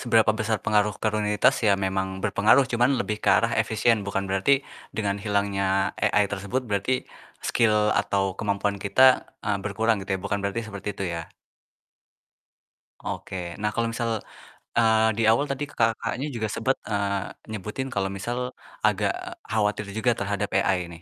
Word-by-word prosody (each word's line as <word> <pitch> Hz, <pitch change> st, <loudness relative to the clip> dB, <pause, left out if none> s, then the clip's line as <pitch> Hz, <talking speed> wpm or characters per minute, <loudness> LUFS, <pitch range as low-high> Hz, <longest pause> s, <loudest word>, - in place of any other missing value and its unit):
seberapa 115 Hz, -3 st, +4 dB
besar 110 Hz, 0 st, -1 dB
pengaruh 105 Hz, -1 st, +2 dB
ke -, -, -2 dB
rutinitas 105 Hz, -1 st, +3 dB
ya 100 Hz, -2 st, +4 dB
memang 95 Hz, 0 st, -2 dB
berpengaruh, 105 Hz, +6 st, +4 dB
cuma 120 Hz, +2 st, +2 dB
lebih 120 Hz, -5 st, 0 dB
ke -, -, +1 dB
arah 115 Hz, 0 st, +3 dB
efisien 110 Hz, 0 st, +2 dB
bukan 100 Hz, 0 st, -1 dB
berarti 130 Hz, +9 st, +2 dB, 0.3 s
dengan 100 Hz, -2 st, 0 dB
hilangnya 100 Hz, -2 st, 0 dB
AI 105 Hz, -, +3 dB
tersebut, 100 Hz, +6 st, -2 dB
berarti 105 Hz, +5 st, -1 dB, 0.4 s
skill 105 Hz, -2 st, +3 dB
atau 95 Hz, -1 st, +1 dB
kemampuan 100 Hz, -1 st, -1 dB
kita, 130 Hz, +6 st, +4 dB
eee, 105 Hz, -2 st, 0 dB
berkurang 110 Hz, +1 st, 0 dB
gitu 95 Hz, -, -9 dB
ya, -, -, -11 dB
bukan 100 Hz, -, -1 dB
berarti 100 Hz, +3 st, -1 dB
seperti 100 Hz, -1 st, -6 dB
itu 100 Hz, -, -3 dB
ya? 85 Hz, -1 st, -6 dB, 1.8 s
Oke. -, -, -5 dB, 0.3 s
Nah 105 Hz, -, +1 dB
kalau 115 Hz, +2 st, -1 dB
misal, 115 Hz, -1 st, -1 dB, 0.6 s
eee, 110 Hz, -1 st, +4 dB
di 115 Hz, -, +1 dB
awal 130 Hz, +6 st, +4 dB
tadi 140 Hz, +1 st, -4 dB
Kakaknya, 115 Hz, +3 st, 0 dB
juga 110 Hz, -2 st, -2 dB
sempet, 120 Hz, +5 st, 0 dB
eee, 100 Hz, -2 st, -1 dB, 0.2 s
nyebutin 110 Hz, +6 st, -4 dB
kalau 95 Hz, -1 st, 0 dB
misal 100 Hz, +5 st, -4 dB, 0.4 s
agak -, -, +2 dB, 0.3 s
khawatir 105 Hz, -1 st, 0 dB
juga 120 Hz, +1 st, +2 dB
terhadap 100 Hz, 0 st, -2 dB
AI 90 Hz, -2 st, +1 dB
nih. 85 Hz, 0 st, -11 dB
105 Hz, 155 wpm, -25 LUFS, 100-115 Hz, 1.8 s, seberapa